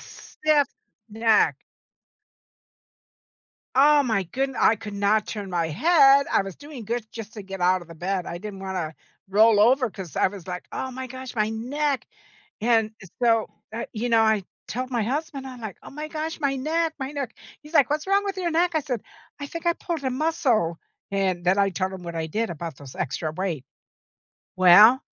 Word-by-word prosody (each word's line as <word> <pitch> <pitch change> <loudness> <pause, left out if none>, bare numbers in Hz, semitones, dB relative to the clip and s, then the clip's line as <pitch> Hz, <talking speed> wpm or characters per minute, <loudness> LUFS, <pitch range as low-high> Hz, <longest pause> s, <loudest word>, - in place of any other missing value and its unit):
Stiff 300 -2 0 0.4
neck. 220 0 +3 2.2
Oh 290 +2 +6
my 220 -7 +1
goodn 265 +8 -2
I 220 - +5
could 210 -1 -8
not 205 +2 +2
turn 205 -3 -5
my 170 -2 0
head. 280 - +5
I - - +4
was 195 -3 -8
doing 285 -5 -10
good 235 +1 -2
just 220 -2 -8
to 210 - -7
get 195 -1 -8
out 180 0 +3
of 170 - -15
the 165 - -10
bed, 180 +2 -2
I 170 - -5
didn't 200 -1 -8
wanna 185 -5 -4 0.3
roll 210 +2 +5
over 250 +2 +4
'cause 190 -5 -9
I - - +4
was 190 -2 -11
like, 180 -1 -5
"Oh 260 - -3
my 260 0 -6
gosh, 260 0 -8
my 215 -1 +1
neck." 275 +5 -1 0.6
And 225 -1 +3 0.3
so, 225 -2 +3 0.3
uh, 230 - -3
you 235 +2 -2
know, 230 -1 +5
I 220 -2 +3 0.2
told 255 +2 -4
my 235 -3 +1
husband, 275 +3 -3
I'm 255 -2 -9
like, 215 -4 -6
"Oh - - -11
my 300 +2 -6
gosh, 315 +2 -4
my 280 -3 0
neck. 320 +4 0
My 265 0 -4
neck." 275 -5 -4 0.3
He's 300 +2 -14
like, 280 -6 +5
"What's 300 +1 -1
wrong 395 +1 +2
with 390 -1 -3
your 350 -3 -1
neck?" 345 +2 +2
I 315 - +2
said, 250 -6 -3 0.4
"I 285 - -5
think 335 +3 -7
I 340 - +4
pulled 330 -4 -4
a 260 - +1
muscle." 255 - +1 0.3
And 190 -3 0
then 185 +2 +3
I 200 0 +3
told 190 0 -2
him 185 -1 -8
what 170 -1 -6
I 160 -1 -2
did 220 +7 -1
about 165 -1 -6
those 140 -3 -11
extra 155 +4 -2
weight. 160 -5 -3 0.9
Well, 200 +8 +8
225 Hz, 195 wpm, -25 LUFS, 195-280 Hz, 2.2 s, Well